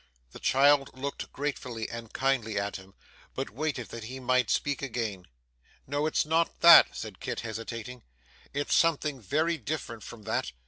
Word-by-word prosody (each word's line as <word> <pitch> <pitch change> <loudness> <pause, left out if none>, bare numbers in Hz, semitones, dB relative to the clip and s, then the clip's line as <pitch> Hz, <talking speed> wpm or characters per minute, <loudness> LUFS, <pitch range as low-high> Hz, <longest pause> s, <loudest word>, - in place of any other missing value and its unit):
The - - -11
child 140 0 +3
looked 140 +2 -5
gratefully 125 -5 -4
and 115 -1 -8
kindly 130 -6 0
at 100 0 -2
him, 95 0 -15 0.4
but - - -3
waited 135 -1 -3
that 115 -2 -7
he 130 +3 -7
might 130 -2 +2
speak 145 -1 0
again. 110 -8 -4 0.6
'No, 145 +3 -1
it's 155 - +1
not 165 +2 0
that,' 170 -1 +9
said 105 -4 -7
Kit - - -4
hesitating, 115 +2 -6 0.5
'it's 145 +1 -1
something 150 -5 +2
very 160 - 0
different 135 -7 -5
from 110 +1 -10
that. 65 - -2
130 Hz, 155 wpm, -29 LUFS, 115-145 Hz, 0.6 s, that